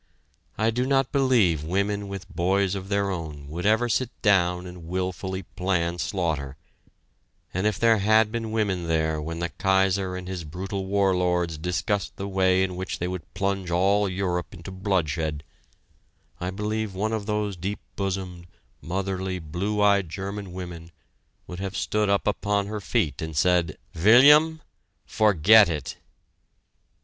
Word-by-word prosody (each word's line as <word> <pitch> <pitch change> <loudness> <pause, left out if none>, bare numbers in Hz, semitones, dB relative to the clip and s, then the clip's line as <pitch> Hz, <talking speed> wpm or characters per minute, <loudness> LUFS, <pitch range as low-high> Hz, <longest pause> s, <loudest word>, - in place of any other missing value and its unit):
I 110 +1 +2
do 125 +3 -1
not 135 -1 +2
believe 120 - +3
women 100 +4 -1
with 100 -2 -7
boys 95 +2 +1
of 95 -1 -5
their 100 -1 +1
own 75 -5 -6
would 85 +5 -2
ever 110 +3 +3
sit 120 +2 0
down 90 -3 +3
and 90 -2 -10
wilfully 95 +1 -3
plan 90 -1 -1
slaughter, 75 -9 -2 1.0
and 95 +3 0
if 105 - 0
there 115 -2 +4
had 110 +2 +4
been 115 -1 -3
women 100 -6 -1
there 80 -1 0
when 80 +2 -5
the 85 0 -2
Kaiser 95 +1 +1
and 90 0 -6
his 90 -2 -5
brutal 95 +5 -5
war 100 -1 +2
lords 90 -2 0
discussed 90 +4 -2
the 100 - -5
way 95 -1 +2
in 95 -1 -2
which 95 +1 -4
they 90 - -2
would 90 -2 -6
plunge 100 -2 -1
all 100 +4 +2
Europe 90 -2 -2
into 85 +2 -9
bloodshed, 80 -6 -1 1.0
I 90 - -3
believe 105 +1 -3
one 110 +4 -1
of 110 -2 -3
those 105 -2 -1
deep 95 +4 -4 0.2
bosomed, 95 -3 -4 0.3
motherly, 95 +1 -3
blue 90 +6 -2
eyed 100 -4 +3
German 100 +2 -5
women 90 -2 -8 0.6
would 90 0 -8
have 95 0 -4
stood 105 -1 0
upon 100 0 +1
her 105 +1 -5
feet 75 -6 -1
and 80 -2 -5
said: 90 -2 +2 0.2
"William 145 - +6 0.4
forget 105 -1 +5
it!" 75 -5 -4
95 Hz, 150 wpm, -25 LUFS, 90-105 Hz, 1.0 s, William